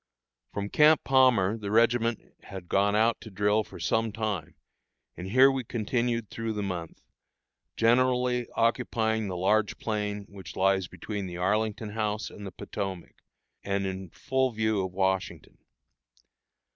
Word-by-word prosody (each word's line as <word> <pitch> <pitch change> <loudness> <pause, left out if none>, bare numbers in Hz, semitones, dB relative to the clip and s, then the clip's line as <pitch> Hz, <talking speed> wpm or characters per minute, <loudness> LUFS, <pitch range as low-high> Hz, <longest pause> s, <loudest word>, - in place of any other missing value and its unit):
From 100 0 -4
Camp 155 0 +5
Palmer 120 -6 +4
the 100 -2 -5
regiment 115 +1 +3 0.3
had 95 -2 -9
gone 100 +2 +2
out 115 +2 +2
to 110 - -9
drill 105 +2 +1
for - - -12
some 115 0 0
time; 105 -7 -3 0.6
and 90 - -7
here 130 +7 +6
we 135 -1 -2
continued 115 0 -1
through 115 -1 -3
the 105 -1 -3
month, 90 -4 -5 0.7
generally 125 +1 +2
occupying 115 -2 +1
the 90 -2 -4
large 105 +3 +1
plain 105 -2 -3
which 95 -5 -11
lies 95 -1 +2
between 95 +3 -5
the 90 -1 -7
Arlington 105 +4 0
House 105 0 -2
and 100 -1 -9
the - - -7
Potomac, 95 -1 -6 0.5
and 100 0 -1
in 95 -1 -5
full 130 +7 0
view 110 -3 0
of 95 - -4
Washington. 95 0 -2
105 Hz, 145 wpm, -28 LUFS, 95-115 Hz, 0.7 s, here